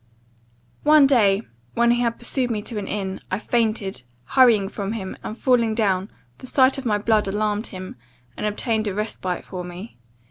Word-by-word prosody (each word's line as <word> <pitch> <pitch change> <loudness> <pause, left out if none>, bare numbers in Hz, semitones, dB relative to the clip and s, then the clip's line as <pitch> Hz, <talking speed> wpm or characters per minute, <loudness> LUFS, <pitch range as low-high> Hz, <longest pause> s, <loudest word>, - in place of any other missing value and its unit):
"One 300 -1 +6
day, 215 -6 +4 0.3
when 235 0 +4
he 240 0 +2
had 235 -1 0
pursued 245 +1 -2
me 215 -3 -2
to 220 -1 -5
an 195 - -6
inn, 190 -2 -3
I - - -1
fainted, 215 - -1 0.2
hurrying 230 - +4
from 200 0 -4
him; 190 -4 -5
and, 215 - -6
falling 235 -4 +2
down, 195 -3 +1 0.3
the 255 - -10
sight 260 +1 +3
of 265 - -4
my 210 -2 +2
blood 215 0 +1
alarmed 210 +2 -1
him, 185 -5 -8 0.4
and - - -2
obtained 215 +1 -1
a 195 - -2
respite 195 -4 -3
for 180 -2 -6
me. 180 - -9
215 Hz, 180 wpm, -23 LUFS, 195-235 Hz, 0.4 s, One